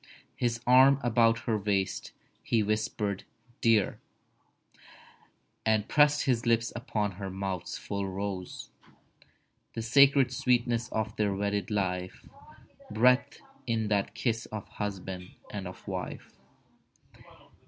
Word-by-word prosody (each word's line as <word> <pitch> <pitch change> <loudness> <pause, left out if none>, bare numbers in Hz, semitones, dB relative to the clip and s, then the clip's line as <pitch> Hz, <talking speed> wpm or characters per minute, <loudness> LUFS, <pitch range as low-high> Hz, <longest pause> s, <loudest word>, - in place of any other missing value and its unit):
His 120 -2 -1
arm 130 +2 +6
about 115 -1 +3
her 110 -2 -1
waist, 100 -2 -1 0.3
he 115 -2 +1
whispered 105 -1 -1 0.4
"Dear," 115 -3 +3 1.6
And 110 -1 +2
pressed 150 0 +4
his 125 -4 +1
lips 115 0 +1
upon 110 -4 -2
her 100 -1 -5
mouth's 95 -2 -4
full 100 -1 -4
rose— 95 -1 -5 1.0
The 115 - -4
sacred 135 +2 +5
sweetness 120 -2 +1
of 110 0 -2
their 105 -2 +1
wedded 100 0 -1
life 95 -3 -2 0.6
Breathed 125 +5 +2 0.2
in 110 -2 0
that 100 -2 0
kiss 115 -2 -1
of 105 -2 -7
husband 95 -3 -6 0.2
and 100 -3 -5
of 90 - -11
wife. - - -5
110 Hz, 110 wpm, -29 LUFS, 100-120 Hz, 1.6 s, arm